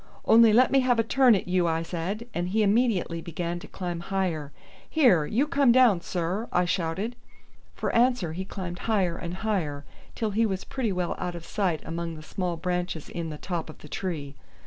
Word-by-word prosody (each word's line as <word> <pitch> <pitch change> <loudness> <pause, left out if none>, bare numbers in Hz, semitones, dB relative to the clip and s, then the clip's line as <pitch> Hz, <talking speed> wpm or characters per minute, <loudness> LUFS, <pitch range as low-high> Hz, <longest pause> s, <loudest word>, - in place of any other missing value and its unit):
"Only 225 0 +7
let 245 +4 +5
me 275 - +5
have 255 -2 +2
a 225 - +3
turn 250 0 +5
at 190 - -3
you," 180 -1 +2
I 165 0 0
said, 185 +7 -4
and 175 +1 -2
he 215 +3 +2
immediately 205 -6 +1
began 170 +1 -4
to - - -11
climb 175 -2 -4
higher. 170 -5 -2 0.4
"Here, 215 - +4
you 245 +7 +1
come 285 -5 +3
down, 235 -8 +5
sir," 180 +6 -2
I 180 0 +2
shouted. 185 +7 -2 0.6
For - - -2
answer 235 -9 +2
he 185 +3 -4
climbed 185 -2 -6
higher 190 -6 +2
and 170 +1 -5
higher 155 -9 -1 0.3
till 220 -2 -1
he 225 +3 +2
was 190 -2 -3
pretty 245 -6 -2
well 180 -2 -1
out 180 -1 -3
of 170 -1 -8
sight 185 -6 -1
among 165 0 -4
the 155 - -10
small 175 +1 -3
branches 180 -2 -3
in 170 -2 -4
the 150 - -6
top 170 -1 -4
of 155 - -10
the - - -13
tree. 150 -6 -4
180 Hz, 200 wpm, -27 LUFS, 170-220 Hz, 0.6 s, Only